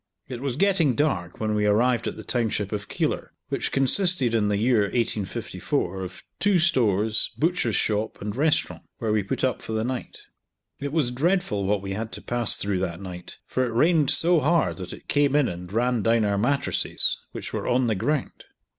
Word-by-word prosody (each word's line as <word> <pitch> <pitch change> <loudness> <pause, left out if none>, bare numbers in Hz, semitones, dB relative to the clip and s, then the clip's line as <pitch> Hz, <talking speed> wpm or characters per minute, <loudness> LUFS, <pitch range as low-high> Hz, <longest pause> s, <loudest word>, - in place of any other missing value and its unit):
It 125 -2 -7
was 135 -3 -2
getting 180 - +2
dark 135 - -1
when 110 -1 -1
we 105 0 +1
arrived 120 +3 +2
at - - -3
the - - -8
township 110 -5 -1
of 105 -2 -5
Keilor, - - -2 0.2
which - - -1
consisted 135 - +3
in 110 -2 +2
the 105 -1 +1
year 115 +2 +2
1854 100 -3 -2
of 90 -1 -8 0.2
two 200 -2 +3
stores, 110 - +2
butcher's 160 - 0
shop, 110 0 -1
and 105 0 -5
restaurant, 150 +3 +1 0.2
where 110 -3 -2
we 105 - +2
put 100 - -4
up 130 -2 0
for 110 - -6
the 110 0 0
night. 125 +1 -5 0.6
It 140 0 -4
was 150 -6 +1
dreadful 140 - 0
what 100 0 0
we 95 - -5
had 110 +2 -4
to - - -6
pass 120 -2 0
through 100 -2 -1
that 90 -2 -3
night, 90 -2 -9
for 130 - -1
it 120 -2 -2
rained 155 +1 +3
so 170 0 +7
hard 165 +2 +1
that 90 -2 -7
it - - -11
came 145 -1 +2
in 145 -3 +3
and 90 +1 -7
ran 120 +2 +1
down 115 0 +2
our 100 -1 +1
mattresses, 140 +5 +1
which - - -7
were - - -3
on 125 +1 +2
the 115 - +1
ground. 125 +8 -2
115 Hz, 200 wpm, -25 LUFS, 105-140 Hz, 0.6 s, so